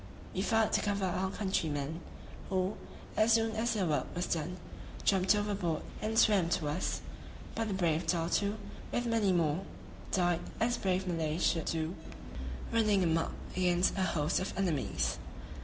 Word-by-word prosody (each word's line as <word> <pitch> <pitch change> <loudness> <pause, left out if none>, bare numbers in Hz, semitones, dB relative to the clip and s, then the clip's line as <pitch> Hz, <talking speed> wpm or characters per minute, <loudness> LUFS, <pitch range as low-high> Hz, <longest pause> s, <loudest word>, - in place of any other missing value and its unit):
We 185 - -1
fired 220 +2 +2
to - - +3
cover 205 -2 0
our 185 +1 0
countrymen, 160 -6 -1 0.5
who, 185 +1 +1 0.4
as 220 +1 +5
soon 225 0 +3
as 230 +1 +1
their 195 -3 +1
work 150 -5 0
was 175 +1 0
done, 170 +2 -2 0.5
jumped 190 +1 +4
overboard 200 -6 -1 0.2
and 220 +1 -1
swam 205 -7 +5
to 155 -5 -3
us; 150 +5 -1 0.5
but 225 0 -1
the 200 - -1
brave 170 -3 +1
Datoo, 180 +5 +1 0.3
with 240 - 0
many 225 -4 +2
more 170 0 +2 0.5
died 175 -2 +2 0.2
as 240 +2 +2
brave 190 0 0
Malays 165 -2 0
should 165 -2 +2
do, 160 +1 -1 0.8
running 215 -4 +3
a - - +2
muck 165 0 +1 0.2
against 180 0 +3
a 195 - -1
host 160 -3 +1
of 185 - -4
enemies. 175 -8 0
185 Hz, 155 wpm, -32 LUFS, 165-205 Hz, 0.8 s, as